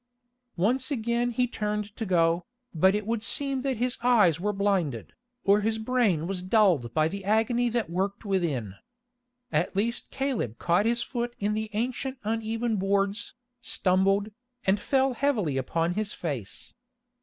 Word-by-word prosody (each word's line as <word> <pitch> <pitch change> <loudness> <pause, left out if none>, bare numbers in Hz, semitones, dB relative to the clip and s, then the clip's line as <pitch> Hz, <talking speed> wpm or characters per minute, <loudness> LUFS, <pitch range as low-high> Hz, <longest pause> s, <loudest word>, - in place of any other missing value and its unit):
Once 250 +9 +1
again 235 -2 0
he 245 +1 +1
turned 210 -3 -3
to 225 - -4
go, 170 -1 +2 0.3
but 190 +4 +4
it 210 -1 -2
would 225 0 -1
seem 275 +3 +2
that 265 -2 -1
his 245 +2 -1
eyes 210 -10 +4
were 205 +3 0
blinded, 195 - -1 0.3
or 200 +1 +4
his 220 +1 0
brain 220 -8 +1
was 185 0 -3
dulled 185 - +3
by 155 0 +3
the 195 +4 -6
agony 225 +4 +2
that 230 -4 -1
worked 190 +5 -2
within. 160 - -1 0.8
At 155 +5 0
least 230 +4 -1
Caleb 260 - -2
caught 180 +5 +2
his 235 +1 +1
foot 240 -1 -4
in 210 +1 -1
the 220 0 -2
ancient 255 +4 -2
uneven 225 +1 -1
boards, 195 +3 0 0.2
stumbled, 195 -1 +1 0.3
and 195 +2 +3
fell 265 +3 +1
heavily 230 - 0
upon 165 +6 0
his 210 +1 -2
face. 135 - -6
210 Hz, 155 wpm, -27 LUFS, 180-235 Hz, 0.8 s, but